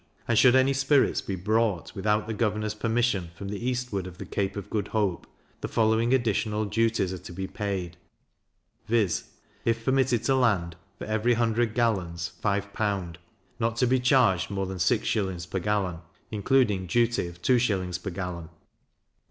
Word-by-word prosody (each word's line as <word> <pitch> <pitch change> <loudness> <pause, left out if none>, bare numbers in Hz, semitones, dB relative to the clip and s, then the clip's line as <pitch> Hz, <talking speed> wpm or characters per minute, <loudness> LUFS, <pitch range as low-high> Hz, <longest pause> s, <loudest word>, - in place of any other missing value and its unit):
And 115 - +2
should 125 +3 +6
any 130 +1 +4
spirits 135 +1 +3
be 95 - -4
brought, 105 0 0
without 105 +1 0
the 110 - -4
governor's 105 -1 -1
permission, 110 -5 0
from 100 +3 -7
the 105 +2 -5
eastward 125 -7 -2
of 90 -1 -10
the - - -7
Cape 100 -1 -2
of 100 - -7
Good 105 -2 -1
Hope, 105 -5 -1 0.3
the - - -4
following 110 +1 +2
additional 110 -3 +1
duties 110 -2 +1
are 95 - -6
to - - -10
be 95 +2 -4
paid; 95 -4 -4 0.9
viz. 110 -6 +1 0.4
If 115 0 0
permitted 130 -3 +2
to - - +1
be - - +2
landed, 95 -9 +1 0.2
for - - -6
every 110 +3 +1
100 115 -1 +1
gallons, 90 -8 0
5L.; 100 -3 -1 0.4
not 115 0 0
to 125 - +2
be 130 +1 +3
charged 125 -8 +3
more 100 -1 -2
than 95 0 -5
6s. 90 +1 0
per 95 +4 -2
gallon, 95 -3 -1 0.3
including 105 -3 +2
duty 115 -1 +1
of 85 0 -11
2s. 95 -8 +1
per 95 - -4
gallon; 90 -2 -5
5L. - - -15
105 Hz, 170 wpm, -27 LUFS, 95-115 Hz, 0.9 s, should